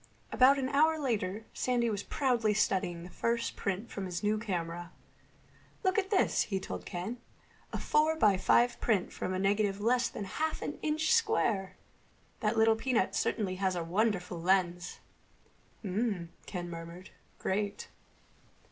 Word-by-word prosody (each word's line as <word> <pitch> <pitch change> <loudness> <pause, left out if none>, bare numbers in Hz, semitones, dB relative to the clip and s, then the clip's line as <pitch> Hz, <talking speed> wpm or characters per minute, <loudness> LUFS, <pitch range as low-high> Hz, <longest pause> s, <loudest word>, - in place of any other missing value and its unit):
About 265 +2 +6
an 265 -1 -1
hour 315 +3 +4
later 220 -7 -2
Sandy 245 -2 +1
was 205 -3 -1
proudly 235 -4 +1
studying 180 -5 0
the 180 - -10
first 230 +4 -1
print 200 +3 -3
from 195 -2 -4
his 180 +2 -4
new 210 +1 +2
camera. 175 -4 -4 0.9
"Look 375 +2 +3
at 385 -1 -2
this," 395 -3 +3
he 195 -2 -1
told 190 - -6
Ken. 200 +7 -4 0.5
"A - - -2
four 310 +1 +2
by 210 -10 +4
five 240 +5 +3
print 210 -6 +1
from - - -3
a 185 - -1
negative 200 +1 +1
less 240 +3 +2
than - - -6
half 310 +11 -2
an 295 - -5
inch 310 +7 +1
square! 230 - +1 0.6
That 215 +1 0
little 220 0 +5
peanut 240 +1 0
certainly 190 -4 0
has 190 -1 0
a 175 - -2
wonderful 180 -1 0
lens." 175 -1 +1 0.8
"Mmm," 195 -3 -1 0.2
Ken 175 -2 -4
murmured. 170 +2 -8 0.3
"Great." 205 +1 -2
210 Hz, 150 wpm, -31 LUFS, 185-245 Hz, 0.9 s, About